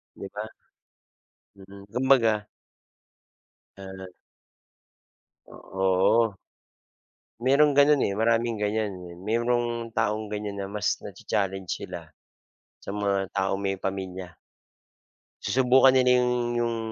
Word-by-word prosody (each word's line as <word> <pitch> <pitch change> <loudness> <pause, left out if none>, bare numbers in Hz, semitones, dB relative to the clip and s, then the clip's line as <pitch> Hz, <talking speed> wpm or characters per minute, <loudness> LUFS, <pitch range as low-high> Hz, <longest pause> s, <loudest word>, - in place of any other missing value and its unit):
'Di 100 - -7
ba? 105 +1 -5 1.1
Mm, 100 0 -13
kumbaga 115 -5 +2 1.3
Ah. 95 -1 -9 1.4
O - - -16
oo. 95 +4 +1 1.1
Mayroong 145 +3 +5
gano'n, 145 0 +4
eh, - - 0
maraming 115 0 +1
ganyan. 105 0 -1 0.3
Mayrong 120 +1 -1
taong 110 -1 0
ganyan, 105 -1 -5
na 100 - -4
mas 105 0 -1
na-cha-challenge 95 -2 -3
sila, - - -5 0.7
sa - - -8
mga 100 -1 0
taong 95 0 0
may 100 0 -1
pamilya. 95 -2 -5 1.1
Susubukan 130 +4 +5
nila 125 -1 +4
'yong, 125 0 +1 0.3
'yong 115 -1 -1
105 Hz, 100 wpm, -26 LUFS, 100-120 Hz, 1.4 s, Mayroong